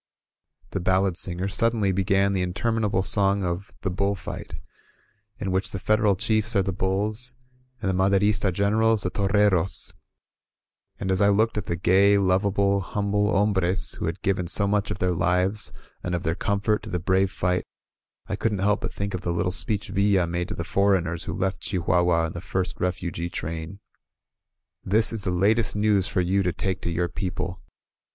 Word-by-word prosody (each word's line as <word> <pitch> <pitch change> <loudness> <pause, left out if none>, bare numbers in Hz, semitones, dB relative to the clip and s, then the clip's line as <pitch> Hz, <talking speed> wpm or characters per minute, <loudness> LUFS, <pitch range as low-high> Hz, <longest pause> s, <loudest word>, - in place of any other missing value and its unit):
The 95 - -2
ballad 95 0 +1
singers 90 +2 -1
suddenly 110 -2 +2
began 95 +1 +2
the 95 - 0
• - - +1
interminable 100 +1 0
song 100 0 +3
of 90 +3 -3
"The 95 - -2
Bull 100 +2 0
Fight," 85 - -7 0.8
in 100 -5 -3
which 95 +1 0
the - - -5
Federal 105 +1 +2
chiefs 110 +4 0
are 100 - +3
the 95 0 -2
bulls, 105 +7 0 0.4
and 100 - -3
the 95 - +1
Maderista 100 +2 +2
generals 105 +3 +2
the 90 - -1
torreros; 100 -2 +1 1.1
and 95 -1 -2
as 95 - +1
I 100 - +5
looked 110 +3 +2
at 105 -2 -3
the 85 - -1
gay, 95 +4 +4
lovable, 100 +1 +2
humble 105 +1 0
hombres 100 -2 +1
who - - -3
had - - -5
given 95 -2 0
so 100 +3 +2
much 100 0 0
of - - -3
their 90 0 0
lives 90 +4 +1 0.3
and 90 0 -2
of 85 - -3
their 80 - 0
com 100 +2 -1
fort 105 0 +1
to - - -9
the 90 - -1
brave 95 +2 +1
fight, 90 -2 -1 0.6
I - - -3
couldn't 110 -3 -1
help 100 +2 +1
but - - -4
think 100 0 -4
of 90 - -3
the 90 - -3
little 90 +2 0
speech 105 +2 -1
Villa 100 -2 +2
made 85 +1 -3
to 105 - -5
the 85 - -3
foreigners 90 -3 +1
who - - -4
left 95 0 -2
Chi 95 - -1
huahua 85 -1 +2
in 80 - -5
the 85 - -6
first 95 0 -3
refugee 85 -1 -2
train: 80 +2 -5 1.0
"This 110 +4 +2
is 110 -3 -5
the - - 0
latest 100 +6 +2
news 105 -2 +2
for 90 - 0
you 95 +3 +1
to 90 -2 0
take 95 +3 -3
to - - -3
your 85 +1 0
peo 90 +1 -3
ple. 90 +1 -5
95 Hz, 190 wpm, -25 LUFS, 90-100 Hz, 1.1 s, I